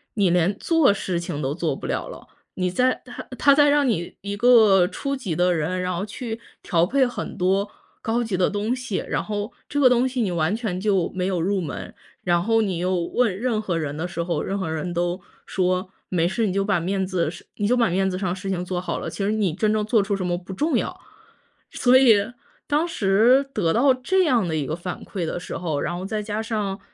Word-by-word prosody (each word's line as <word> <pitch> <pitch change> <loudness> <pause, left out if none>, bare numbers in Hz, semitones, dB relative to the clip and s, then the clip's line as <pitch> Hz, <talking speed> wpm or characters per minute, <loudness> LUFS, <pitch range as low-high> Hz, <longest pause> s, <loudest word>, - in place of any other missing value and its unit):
你 195 -5 +3
连 180 +3 +2
做 325 -9 +3
事 185 -3 -2
情 150 -4 -4
都 135 - -1
做 160 -3 -1
不 - - -8
了 - - -2
了， - - -11 0.3
你 185 -1 0
在 255 +6 +1
他 245 - -8
他 280 - +5
在 290 +1 +5
让 290 -2 +3
你 175 -7 -2
一 200 +1 -4
个 215 -6 +6
初 275 +7 -3
级 200 - -4
的 180 +1 +3
人， 175 +3 -1
然 180 0 -1
后 175 - -2
去 225 +2 -6 0.2
调 170 0 +2
配 265 +5 +2
很 245 - -5
多 195 +3 +1 0.3
高 235 +2 0
级 215 -4 -2
的 185 - +2
东 210 +4 -1
西， 250 -6 -3
然 - - -1
后 210 0 -4 0.2
这 290 - -2
个 260 - +6
东 250 +1 +3
西 255 -1 -2
你 195 -5 0
完 170 +4 0
全 210 -6 -3
就 195 -4 +1
没 180 -1 -1
有 180 -3 -1
入 195 +2 +1
门， 160 -5 -6 0.3
然 175 -1 +2
后 225 +3 +2
你 190 -5 -1
又 180 +2 0
问 185 +4 0
任 225 -2 0
何 180 -5 -2
人 150 -3 -3
的 170 +3 -2
时 170 -1 -3
候， 170 0 -1
任 195 - -2
何 185 -5 -3
人 165 +3 -3
都 175 +2 -1 0.3
说 185 0 0 0.2
没 170 -2 +1
事 215 +5 0
你 185 - -1
就 195 0 +1
把 195 -3 +1
面 190 +2 -1
子 180 -4 -1
是 170 - -11
你 205 -1 0
就 250 - +3
把 235 -5 +3
面 190 +2 +1
子 185 - -3
上 185 -2 -2
的 180 - -1
事 195 0 -6
情 180 -2 -1
做 180 0 -3
好 180 - -3
了， - - -4
其 200 - -4
实 205 - +1
你 210 -6 0
真 215 +5 +1
正 215 -1 +1
做 220 -1 +3
出 200 0 -1
什 190 -2 -3
么 175 -1 0
不 185 +2 -9
重 305 - +1
要。 - - -3 0.7
所 250 +1 +4
以 250 -5 +7 0.5
当 305 +3 +1
时 235 - +3
得 170 -6 +1
到 265 +4 +4
这 370 +9 +1
样 240 - +2
的 160 - -2
一 150 - -1
个 155 - -2
反 175 +1 -6
馈 185 -5 -4
的 170 - -3
时 - - -6
候， 160 -5 -2
然 175 - -2
后 185 - -5
再 215 +1 -2
加 210 0 -3
上 210 -4 -3
195 Hz, 265 characters per minute, -23 LUFS, 180-225 Hz, 0.7 s, 以